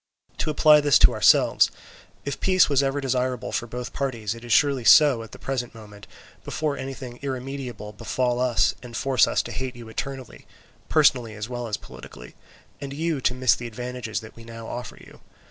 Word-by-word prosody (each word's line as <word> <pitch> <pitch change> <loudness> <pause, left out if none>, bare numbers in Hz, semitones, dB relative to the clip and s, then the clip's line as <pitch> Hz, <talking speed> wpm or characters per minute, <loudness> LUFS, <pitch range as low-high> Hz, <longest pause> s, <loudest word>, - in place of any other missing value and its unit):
"To - - -1
apply 150 0 +5
this 145 -3 +5
to - - +6
ourselves: - - +4 0.6
if 140 - -4
peace 185 -1 +4
was 140 -2 +3
ever 135 +1 -1
desirable 130 -2 -2
for 120 - -2
both 125 +1 -6
parties, 115 -7 -3
it 115 0 -12
is 120 - -7
surely 140 +1 +3
so 140 -1 +6
at 115 -1 -11
the - - -10
present 125 -3 -4
moment, 105 -2 -13 0.4
before 155 -2 -2
anything 130 -3 -7
irremediable 130 -5 -6
befall 125 +3 -1
us 125 -2 +2
and 120 -2 -8
force 130 -4 +3
us - - 0
to 120 - -8
hate 130 +3 -5
you 120 -2 -11
eternally, 130 +1 -7 0.4
personally 125 -8 +3
as 105 +2 -6
well 120 -1 -4
as 105 - -2
politically, 60 +1 -12 0.5
and 140 -1 -6
you 160 -1 -2
to 125 - +1
miss 130 -2 +3
the 120 - -5
advantages 125 -1 -5
that 110 - -13
we 115 - -13
now 115 0 -10
offer 120 -1 -7
you. - - -16
125 Hz, 190 wpm, -24 LUFS, 115-135 Hz, 0.6 s, to